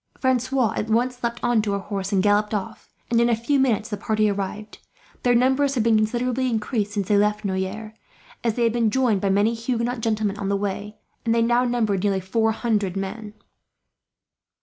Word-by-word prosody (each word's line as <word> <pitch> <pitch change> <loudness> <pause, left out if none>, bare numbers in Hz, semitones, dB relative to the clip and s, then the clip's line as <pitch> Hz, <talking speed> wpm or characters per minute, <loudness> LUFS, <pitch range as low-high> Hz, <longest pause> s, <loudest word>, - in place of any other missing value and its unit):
Francois 255 -3 +1
at 220 - -3
once 245 +3 0
leapt 235 0 -2
on 240 -2 +3
to 205 -2 -1
a - - -2
horse 195 -1 -4
and 190 -2 +2
galloped 210 +1 +2
off, 195 -2 -6 0.2
and 235 0 +4
in 235 - +3
a 235 - +3
few 250 +5 0
minutes 230 -5 +1
the 210 - -2
party 215 +1 +1
arrived. 205 +2 -5 0.4
Their 245 -1 +3
numbers 265 +3 +2
had 235 - +1
been 230 -1 +3
considerably 245 +4 0
increased 215 -2 -2
since 200 -3 -2
they 205 -1 +3
left 210 0 0
Noyers, 195 +3 -3 0.5
as 230 -2 0
they 240 - 0
had 230 -1 +2
been 235 -2 +2
joined 230 -5 +1
by 200 - +1
many 205 +4 +2
Huguenot 235 +1 -2
gentlemen 215 -2 -1
on 195 -1 -2
the 200 - +1
way, 205 +1 -4 0.3
and 230 0 +1
they 230 - +3
now 240 +2 +2
numbered 220 -6 0
nearly 200 -2 +1
four 220 +4 0
hundred 210 -4 -1
men. 210 +2 -5
220 Hz, 200 wpm, -23 LUFS, 205-240 Hz, 0.5 s, and